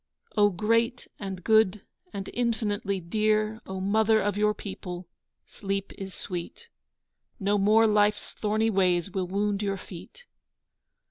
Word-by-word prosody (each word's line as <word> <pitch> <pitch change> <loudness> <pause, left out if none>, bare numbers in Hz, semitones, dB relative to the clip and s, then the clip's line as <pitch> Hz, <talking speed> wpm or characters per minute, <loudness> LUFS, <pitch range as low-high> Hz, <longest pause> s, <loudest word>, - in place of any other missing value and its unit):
O 205 -1 +5
great 230 +6 0
and 190 -3 -6
good 220 -3 +3 0.3
and 195 -1 -5
infinitely 215 -5 -1
dear, 215 +4 0
O 190 0 -4
Mother 220 +3 +3
of 205 -1 0
your 210 0 +2
people, 180 -3 -7 0.4
sleep 195 -1 -4
is 190 -1 -7
sweet, 185 - -6 0.7
No 205 0 +1
more 215 +3 +5
Life's 210 -1 +2
thorny 215 +1 0
ways 185 -2 +2
will 190 -2 -2
wound 200 +2 0
your 195 -1 -1
feet. 200 - -12
205 Hz, 130 wpm, -27 LUFS, 195-215 Hz, 0.7 s, O